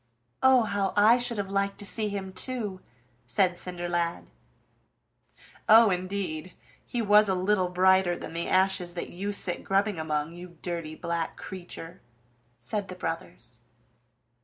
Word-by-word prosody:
"Oh, 260 -2 +6
how 205 -2 -1
I 220 +4 +6
should 240 -2 +2
have 195 -1 -3
liked 200 0 0
to 205 - -5
see 215 +1 -1
him 195 -2 -5
too!" 205 -2 -2 0.5
said 180 +7 +1
Cinderlad. 175 - -3 1.4
"Oh, 220 -1 +8
indeed! 185 -2 -3 0.3
He 240 -2 -3
was 210 0 +5
a 190 - +2
little 185 0 +1
brighter 185 0 +3
than - - -8
the 170 0 -2
ashes 185 -2 +2
that 170 - -5
you 195 +4 -3
sit 180 -3 -2
grubbing 195 -1 +1
among, 155 0 -2
you 175 -1 -11
dirty 170 -3 -4
black 170 -1 -3
creature!" 180 -1 -8 0.6
said 190 - -4
the 185 - -8
brothers. 145 -9 -6
185 Hz, 140 wpm, -27 LUFS, 175-205 Hz, 1.4 s, Oh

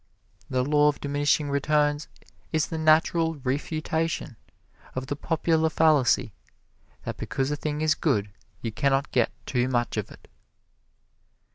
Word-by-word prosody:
The 130 -1 +1
Law 150 +2 +4
of 150 - +1
Diminishing 145 0 +1
Returns 145 +1 +1 0.4
is 160 -2 +2
the 160 - -5
natural 160 +1 +3
refutation 155 +2 -2 0.6
of 130 0 -3
the 145 - -3
popular 160 +1 +1
fallacy 150 -9 +3 0.7
that - - -5
because 135 +1 -2
a - - +1
thing 150 0 -3
is 155 0 +3
good 105 -10 0 0.3
you 115 - -2
can 140 +5 +1
not 135 +1 0
get 120 -3 +2 0.2
too 125 -1 0
much 120 -2 -1
of - - -2
it. - - -15
145 Hz, 140 wpm, -26 LUFS, 135-155 Hz, 0.7 s, Law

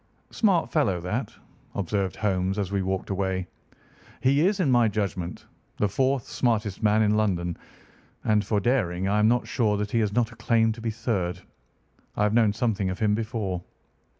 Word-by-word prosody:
"Smart 195 -7 +2
fellow, 105 - +1
that," 105 +7 -3 0.4
observed 100 0 -1
Holmes 95 -2 0
as 100 -2 -2
we 100 -1 0
walked 95 +1 -2
away. 95 -1 -1 0.7
"He 140 +3 +3
is, 195 +3 +2
in 155 -8 +2
my 120 -2 +5
judgment, 100 -4 -3 0.3
the 105 - +2
fourth 130 +3 0
smartest 110 -5 -1
man 110 0 +3
in 105 0 +3
London, 90 -5 0 0.7
and 105 -1 +2
for 105 +1 0
daring 95 -6 0
I 105 +2 +2
am 105 - +4
not 120 +2 +2
sure 105 -4 +1
that 105 0 -3
he 115 - +2
has 105 -2 +1
not 120 +1 +1
a - - -13
claim 115 0 +2
to 115 +1 -7
be 115 - -1
third. 105 -6 -2 0.8
I 105 - +2
have 105 0 +2
known 115 -3 +4
something 105 -3 0
of 95 - -3
him 105 -1 +2
before." 105 -5 -2
105 Hz, 180 wpm, -26 LUFS, 95-115 Hz, 0.8 s, my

